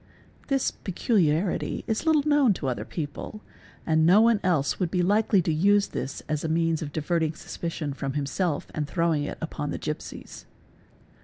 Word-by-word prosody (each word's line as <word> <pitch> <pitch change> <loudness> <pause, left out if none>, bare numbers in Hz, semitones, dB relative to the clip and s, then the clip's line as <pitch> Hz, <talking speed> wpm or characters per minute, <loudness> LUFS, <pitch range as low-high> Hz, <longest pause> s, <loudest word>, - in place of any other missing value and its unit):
This 270 -2 +1
peculiarity 180 -3 0
is 225 +7 -2
little 305 -2 +3
known 290 -7 +4
to 150 - -6
other 125 - -2
people 160 +7 -6 0.4
and 160 -1 +3
no 180 +6 +6
one 230 -1 +4
else: 165 -7 +1
would 180 -3 0
be 180 0 +1
likely 205 0 +3
to 160 - 0
use 200 +5 +3
this 135 - -5
as 155 -1 -2
a 160 - -1
means 165 0 +1
of 150 -2 -5
diverting 160 +1 -1
suspicion 160 -3 -5
from 135 -1 -4
himself 145 +3 -1
and 150 -2 -2
throwing 165 -3 +1
it - - -5
upon 150 -2 -4
the - - -3
gipsies. 150 0 -7
165 Hz, 170 wpm, -26 LUFS, 150-200 Hz, 0.4 s, no